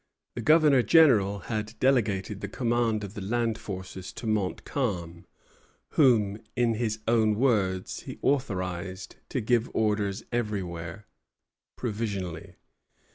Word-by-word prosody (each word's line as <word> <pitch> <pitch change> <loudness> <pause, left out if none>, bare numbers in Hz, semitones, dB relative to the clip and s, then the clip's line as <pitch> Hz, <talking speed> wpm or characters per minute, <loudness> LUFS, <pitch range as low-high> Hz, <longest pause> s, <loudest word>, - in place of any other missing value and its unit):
The 120 - -4
Governor 150 -1 +5
General 110 - +5
had 110 +2 -4
delegated 105 -6 +1
the 100 - -3
command 115 -1 0
of 100 -1 -7
the 105 - -6
land 115 +2 -1
forces 95 -1 -7
to - - -8
Montcalm, 95 - -2 0.6
whom, 110 -8 +3 0.2
in 120 -2 +2
his 110 -1 -1
own 110 -2 +3
words, 100 -7 +1
he - - -8
authorized 95 -8 -2
"to 130 - -1
give 115 +1 +1
orders 105 -2 0
everywhere, 100 -5 -3 0.7
provisionally." 100 -8 -4
105 Hz, 115 wpm, -27 LUFS, 95-120 Hz, 0.7 s, Governor